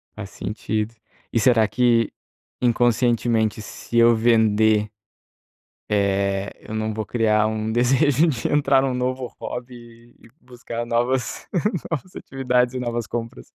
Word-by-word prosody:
Faz 100 -2 -7
sentido. 110 +1 -4 0.4
E 115 - +1
será 115 -2 +4
que, 120 -2 +2 0.5
inconscientemente, 120 -2 +1
se 120 - -6
eu 115 0 +6
vender, 110 -2 +3 1.0
eh, 100 -1 0 0.2
eu 110 - -7
não 110 0 -2
vou 110 0 -4
criar 110 -2 +2
um 110 0 -2
desejo 135 +6 +3
de 130 -7 -1
entrar 140 -2 +3
em 135 - +1
um 130 - -1
novo 130 0 -2
hobby 120 -1 -9
e - - -18
buscar 120 -2 -7
novas 120 +1 -1 0.4
novas 165 +3 -4
atividades 125 -2 0
e 130 - -3
novas 120 -2 -3
compras? 120 +3 -6
120 Hz, 130 wpm, -22 LUFS, 110-125 Hz, 1.0 s, eu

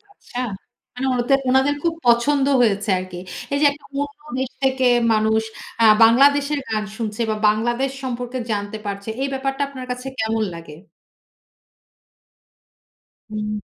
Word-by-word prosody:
আচ্ছা। 405 -11 -12 0.6
মানে 250 +2 -3
ওদের, 270 +3 +3
ওনাদের 265 +2 +3
খুব 335 -1 +1
পছন্দ 265 +4 +4 0.2
হয়েছে 210 -2 +1
আরকি। 185 -1 -7 0.3
এই 280 - +2
যে 295 - +5
একটা 285 - -15 0.2
অন্য 285 +1 -7 0.2
দেশ 260 -1 -2
থেকে 265 -1 +1 0.3
মানুষ 220 0 +2 0.4
অ্যা 230 - +5 0.2
'বাংলাদেশের' 280 +5 +5
গান 215 -1 -1
শুনছে 220 0 -3
বা 215 - 0
'বাংলাদেশ' 240 +5 +1
সম্পর্কে 250 0 -4
জানতে 205 +1 -3
পারছে, 200 +1 -5
এই 275 - 0
ব্যাপারটা 270 +1 -2
আপনার 260 -2 -8
কাছে 250 +1 -5
কেমন 220 0 0
লাগে? 165 -2 -10 2.6
হুম। 210 0 -3
245 Hz, 135 wpm, -21 LUFS, 215-270 Hz, 2.6 s, যে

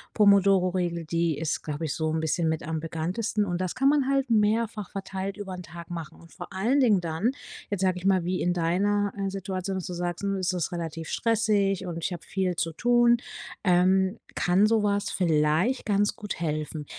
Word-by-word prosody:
Pomodoro-Regel. 185 -4 +3
Die 165 -1 0
ist, 160 0 -2
glaube 150 +1 -4
ich, 150 - -2
so 160 -1 -1
'n 160 - 0
bisschen 160 +1 0
mit 160 0 -2
am 160 0 -3
bekanntesten. 180 +7 -2
Und 175 -2 -2
das 185 -2 -2
kann 270 +1 +2
man 280 -2 +3
halt 275 -2 +1
mehrfach 215 -1 +1
verteilt 195 0 -5
übern 190 -3 -6
Tag 170 0 -10
machen 165 -3 -7
und 170 - -17
vor 175 0 -9
allen 220 +9 +1
Dingen 220 -8 +4
dann, 165 +6 0 0.4
jetzt 200 -2 -2
sage 185 -1 +1
ich 180 - -10
mal, 190 -2 +3
wie 180 +1 -1
in 175 - +1
deiner 195 +4 +1
äh, 195 -1 -1
Situation, 190 0 -4
dass 185 - -4
du 180 - -5
sagst: 175 +1 -3
„Hm 195 0 0
es 180 -2 -1
relativ 165 -2 -5
stressig 205 -4 +1
und 175 -2 -5
ich - - -1
habe 170 -3 -7
viel 185 +1 -1
zu 165 -1 -2
tun“, 240 +4 +4 0.5
ähm, 190 +2 +3 0.2
kann 180 +4 +3
sowas 210 -2 +1
vielleicht 165 - +1
ganz 205 0 +1
gut 210 -5 -6
helfen. 155 -1 -3
185 Hz, 195 wpm, -27 LUFS, 170-205 Hz, 0.5 s, Dingen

